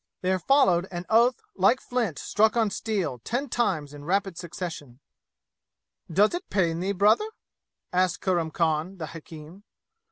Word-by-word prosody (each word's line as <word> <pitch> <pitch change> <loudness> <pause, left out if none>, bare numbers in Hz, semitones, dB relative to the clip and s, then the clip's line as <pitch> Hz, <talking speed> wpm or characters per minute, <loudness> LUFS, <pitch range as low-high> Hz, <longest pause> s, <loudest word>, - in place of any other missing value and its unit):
There 185 0 +1
followed 190 - +3
an 175 -1 -6
oath 235 +2 +4
like 200 +7 +4
flint 235 - -2
struck 220 +2 +2
on 220 -3 +2
steel 190 - -2
ten 245 - -3
times 155 -13 -1
in 145 0 -10
rapid 195 +2 0
succession. 165 -7 -7 1.1
"Does 205 +6 +4
it 355 +2 -5
pain 170 -4 +1
thee, 190 +3 -1
brother?" 210 - +3 0.6
asked 185 0 +2
Kurram 175 -4 0
Khan 160 +3 -1
the 165 - -4
hakim. 160 +3 -11
185 Hz, 140 wpm, -26 LUFS, 165-215 Hz, 1.1 s, oath